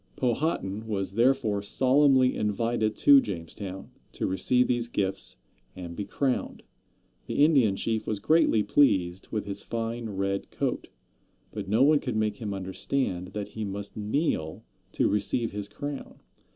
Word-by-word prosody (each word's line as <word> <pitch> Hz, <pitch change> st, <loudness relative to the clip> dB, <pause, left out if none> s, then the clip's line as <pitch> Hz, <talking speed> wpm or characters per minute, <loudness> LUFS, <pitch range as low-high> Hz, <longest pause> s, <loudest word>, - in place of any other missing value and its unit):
Powhatan 115 Hz, -, -1 dB
was 100 Hz, -4 st, -2 dB
therefore 115 Hz, -2 st, +2 dB
solemnly 130 Hz, +4 st, +3 dB
invited 110 Hz, +1 st, 0 dB
to 140 Hz, -1 st, +7 dB
Jamestown, 95 Hz, 0 st, -7 dB, 0.2 s
to -, -, -2 dB
receive 125 Hz, +7 st, +2 dB
these 120 Hz, -1 st, 0 dB
gifts 95 Hz, -4 st, -2 dB, 0.4 s
and 85 Hz, -2 st, -7 dB
be 100 Hz, -, -4 dB
crowned. 130 Hz, +5 st, -2 dB, 0.6 s
The 145 Hz, -, +4 dB
Indian 130 Hz, -11 st, +4 dB
chief 110 Hz, +2 st, -2 dB
was 110 Hz, -, -1 dB
greatly 110 Hz, -1 st, +3 dB
pleased 95 Hz, -11 st, +2 dB
with 105 Hz, -, -3 dB
his 100 Hz, 0 st, -5 dB
fine 115 Hz, 0 st, -4 dB
red 100 Hz, 0 st, -2 dB
coat. -, -, -2 dB, 0.6 s
But -, -, -6 dB
no 110 Hz, +5 st, +4 dB
one 150 Hz, +1 st, +5 dB
could 125 Hz, -5 st, -4 dB
make 110 Hz, -1 st, 0 dB
him 105 Hz, -3 st, -4 dB
understand 95 Hz, 0 st, -2 dB
that 105 Hz, -1 st, -4 dB
he 110 Hz, -, -5 dB
must 100 Hz, 0 st, -6 dB
kneel 105 Hz, -, -1 dB, 0.3 s
to -, -, +2 dB
receive 105 Hz, +3 st, 0 dB
his 100 Hz, 0 st, -5 dB
crown. 145 Hz, +4 st, -6 dB
110 Hz, 145 wpm, -27 LUFS, 100-125 Hz, 0.6 s, to